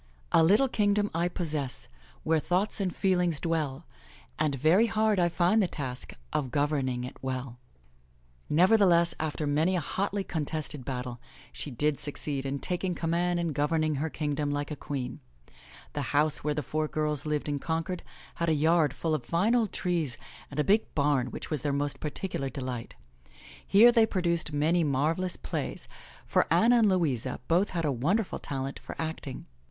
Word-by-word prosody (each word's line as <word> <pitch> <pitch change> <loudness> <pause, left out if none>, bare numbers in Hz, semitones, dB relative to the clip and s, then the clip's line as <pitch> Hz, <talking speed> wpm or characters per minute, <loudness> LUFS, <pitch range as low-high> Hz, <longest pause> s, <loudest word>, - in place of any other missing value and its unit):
A - - +6
little 205 +11 +5
kingdom 205 -3 +1
I 170 +2 +1
possess^ 155 -7 -4 0.4
Where 160 0 +2
thoughts 185 +7 0
and 185 -3 -1
feelings 180 -5 +1
dwell. 155 -3 -2 0.5
And 155 -2 +1
very 165 - +4
hard 215 -2 +2
I 175 -1 +3
find 180 +6 +3
the 190 - +2
task 130 -6 -6 0.2
Of 135 -4 0
governing 140 -3 0
it 125 - -7
well 130 -2 -4 0.9
Nevertheless, 175 0 +5
after 155 -1 -2
many 155 +6 +2
a - - +2
hotly 195 +5 -2
contested 150 -4 -3
battle, 125 -2 -4 0.3
she - - -4
did 145 +3 0
succeed 140 -1 -3
in 140 +1 -2
taking 180 +4 -2
command 175 +1 0
and 170 -3 -1
governing 155 +2 +1
her 160 - -1
kingdom 145 -1 -2
like 145 +1 -2
a - - -2
queen. 135 - -5 0.7
The 145 - -2 0.2
house 150 0 +2
where 150 0 0
the 150 - -2
four 155 +4 -1
girls 150 -1 -1
lived 150 -1 -1
in 145 -1 -1
Concord 165 +4 -2 0.4
had 170 - +2
a 160 - +3
yard 160 -1 +3
full 165 -2 -1
of 155 - -1
fine 185 +8 +1
old 230 -5 +2
trees 165 -9 -1 0.3
and 145 - -5
a - - +4
big 210 +5 +2
barn 140 -3 +2
which - - -7
was 150 -4 0
their 145 - 0
most 145 0 -1
particular 150 -2 -3
delight. 130 -4 -5 0.7
Here 225 +5 +7
they 230 -2 +4
produced 170 -6 0
many 160 +4 +2
marvelous 160 +6 0
plays, - - -5 0.4
for - - +2
Anna 240 +2 +5
and 215 -2 +5
Louisa 135 -10 0
both 180 +5 +3
had 170 -3 -2
a 145 - +2
wonderful 175 - 0
talent 135 0 -4
for - - -8
acting. 160 -5 -5
155 Hz, 170 wpm, -29 LUFS, 145-180 Hz, 0.9 s, Here